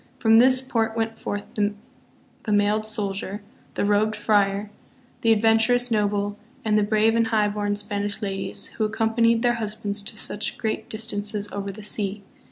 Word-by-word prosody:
From 225 -1 +5
this 255 +1 +6
port 230 -3 -1
went 225 0 -1
forth 205 -2 -4
the 210 +1 -6
mailed 210 +1 +2
soldier, 200 -1 -3 0.3
the - - 0
robed 210 +1 +2
friar, 205 -1 +1 0.5
the 225 - +3
adventurous 225 +3 +3
noble, 205 -1 0 0.3
and 215 -1 +2
the 210 - +4
brave 215 +2 +2
and 230 -1 +2
highborn 210 -2 0
Spanish 205 0 -2
ladies, 195 -2 -3
who - - +2
accompanied 225 +1 +1
their 240 -1 +3
husbands 210 -1 -2
to 215 +2 -6
such 210 +1 -1
great 220 -2 -3
distances 210 -1 -1
over 200 0 -4
the 210 +2 -11
sea. 205 -1 -1
210 Hz, 155 wpm, -24 LUFS, 205-225 Hz, 0.5 s, this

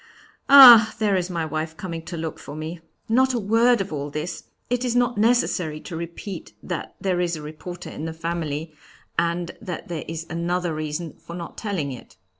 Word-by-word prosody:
Ah! 240 -5 +10
there 210 -2 +2
is 180 -1 -1
my 170 -3 -2
wife 160 +1 -4
coming 170 -3 -5
to 170 0 -6
look 160 0 -4
for 145 - -9
me. 160 +2 -6 0.3
Not 255 +3 +3
a - - +1
word 230 +3 +3
of 195 -4 -5
all 145 0 -3
this! 150 +4 -5 0.2
It 245 0 -1
is 245 -1 -1
not 245 0 +2
necessary 205 -9 +2
to 170 - -7
repeat 170 - -7
that - - -5
there 185 -2 0
is 175 -1 0
a 155 - -7
reporter 175 +4 -8
in 155 - -6
the 165 - -3
family, 160 -1 -4 0.5
and 170 0 -1
there 185 -7 -6 0.2
is 165 0 -5
another 175 +1 -1
reason 155 +1 -4
for 170 - -9
not 170 -1 -7
telling 185 -10 -3
it. 125 - -11
170 Hz, 190 wpm, -24 LUFS, 160-205 Hz, 0.5 s, Ah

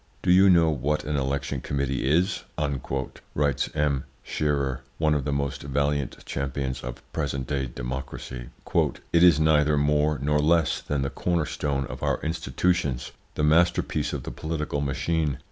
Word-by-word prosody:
"Do - - +3
you 95 +2 +7
know 85 -3 +5
what 75 +2 0
an 75 - -2
election 70 0 -1
committee 70 -2 -1
is?" 90 +7 +2 0.9
writes 70 -3 +1
M. 75 -3 +1 0.2
Scherer, 70 -4 -1 0.2
one 75 -1 +2
of 70 -3 0
the 70 - 0
most 70 -1 -1
valiant 70 0 -1
champions 65 -1 -3
of - - -7
present 70 -4 -2
day 70 -1 -1
democracy. - - -6 0.6
"It 85 - +5
is 85 -4 +7
neither 75 -1 +4
more 75 +1 +2
nor 75 +2 +1
less 80 +1 +3
than 70 -2 -1
the 70 - -2
corner 85 +2 0
stone 70 -2 -1
of - - -8
our - - +1
institutions, 80 -2 0 0.2
the 75 - -1
masterpiece 85 +4 +2
of - - -4
the - - -5
political 75 +2 -3
machine. 70 +1 0
70 Hz, 155 wpm, -26 LUFS, 70-80 Hz, 0.9 s, you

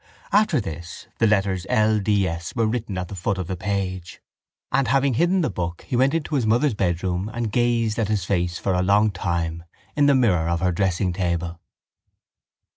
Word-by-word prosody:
After - - +3
this 85 +2 -7
the 115 - +4
letters 95 -3 +1
L. 110 0 +3
D. 100 -1 +1
S. 85 0 -5
were 115 -2 +2
written 110 -3 -2
at 90 -1 -3
the - - -9
foot 95 +1 -2
of 95 - -3
the 95 - -4
page, 95 -1 -3 0.5
and, 135 0 +2
having 135 -1 +2
hidden 175 +9 +2
the 155 - 0
book, 85 -1 -4
he - - -2
went 135 +5 +3
into 160 -1 -3
his 130 -6 +1
mother's 120 +5 +3
bedroom 90 0 -1
and 115 -1 -3
gazed 115 -1 +1
at 110 - +1
his 105 -4 -1
face 90 -2 0
for 95 - -1
a 90 - +1
long 105 +3 +3
time 85 -3 -2 0.3
in 145 -1 +4
the 140 - +5
mirror 90 -10 +2
of 85 0 0
her 90 +1 +1
dressingtable. 85 -2 -1
100 Hz, 195 wpm, -23 LUFS, 90-115 Hz, 0.5 s, the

